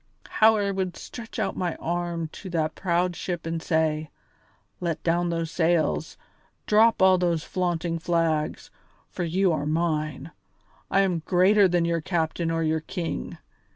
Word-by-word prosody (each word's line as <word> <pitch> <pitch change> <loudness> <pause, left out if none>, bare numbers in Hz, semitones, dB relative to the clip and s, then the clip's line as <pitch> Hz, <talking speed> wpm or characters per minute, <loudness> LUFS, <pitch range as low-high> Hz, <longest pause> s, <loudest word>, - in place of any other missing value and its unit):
How 220 0 +5
I 200 -1 0
would 190 -2 -3
stretch 230 -2 -9
out - - -1
my 175 -2 -2
arm 170 -1 -3
to 190 - -9
that 160 -3 -1
proud 175 -1 0
ship 175 -2 -4
and 165 0 -3
say: 160 -2 0 0.7
'Let 170 -3 -3
down 175 +1 +1
those 165 -1 -2
sails, 170 -2 0 0.5
drop 220 -1 +4
all 185 -1 +6
those 170 -3 0
flaunting 175 -2 -2
flags, 165 -2 -1 0.4
for 180 - -3
you 180 +3 +2
are 150 -2 -1
mine; 155 0 -1 0.6
I 195 - +3
am 185 -4 +1
greater 195 +2 +5
than 175 -1 +1
your 170 -1 0
captain 165 0 -1
or 165 0 0
your 160 0 +1
king! 170 +2 -5
170 Hz, 155 wpm, -25 LUFS, 160-180 Hz, 0.7 s, all